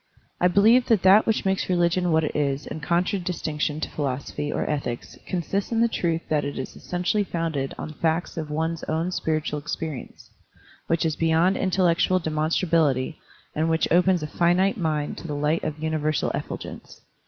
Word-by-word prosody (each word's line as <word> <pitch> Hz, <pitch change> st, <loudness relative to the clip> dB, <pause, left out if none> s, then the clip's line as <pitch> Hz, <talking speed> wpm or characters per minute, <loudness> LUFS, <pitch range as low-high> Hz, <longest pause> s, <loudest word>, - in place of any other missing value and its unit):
I 180 Hz, -, +4 dB
believe 220 Hz, +7 st, +5 dB
that 220 Hz, -5 st, +3 dB
that 195 Hz, +3 st, +6 dB
which 220 Hz, -2 st, +1 dB
makes 190 Hz, 0 st, 0 dB
religion 175 Hz, 0 st, +2 dB
what 160 Hz, 0 st, +3 dB
it 155 Hz, -, -3 dB
is 140 Hz, -1 st, 0 dB
in -, -, -6 dB
contradistinction 170 Hz, -3 st, -1 dB
to -, -, -2 dB
philosophy 140 Hz, +1 st, -3 dB
or -, -, -2 dB
ethics 140 Hz, -5 st, -3 dB
consists 190 Hz, +4 st, -2 dB
in 230 Hz, -, +1 dB
the 235 Hz, -, +5 dB
truth 165 Hz, -7 st, -1 dB
that 150 Hz, -2 st, +1 dB
it 145 Hz, -, -4 dB
is 130 Hz, -, -5 dB
essentially 180 Hz, +4 st, -1 dB
fotmded 165 Hz, -7 st, -3 dB
on 155 Hz, -, -6 dB
facts 160 Hz, +2 st, -1 dB
of 160 Hz, -3 st, -4 dB
one's 160 Hz, +2 st, -2 dB
own 165 Hz, +3 st, -1 dB
spiritual 155 Hz, -4 st, -1 dB
experi 155 Hz, -2 st, -4 dB
ence, -, -, -20 dB, 0.6 s
which 165 Hz, 0 st, +1 dB
is 160 Hz, -2 st, 0 dB
beyond 165 Hz, +3 st, +3 dB
intellectual 185 Hz, -1 st, +2 dB
demonstra 160 Hz, +2 st, 0 dB
bility 150 Hz, -3 st, +2 dB, 0.4 s
and 160 Hz, +2 st, 0 dB
which 160 Hz, 0 st, +2 dB
opens 180 Hz, -1 st, +4 dB
a -, -, -3 dB
finite 175 Hz, +5 st, +2 dB
mind 155 Hz, -5 st, -2 dB
to -, -, -8 dB
the 150 Hz, -, -3 dB
light 150 Hz, +3 st, 0 dB
of 155 Hz, -1 st, -3 dB
universal 155 Hz, -1 st, 0 dB
effulgence. -, -, -7 dB
165 Hz, 175 wpm, -25 LUFS, 150-180 Hz, 0.6 s, that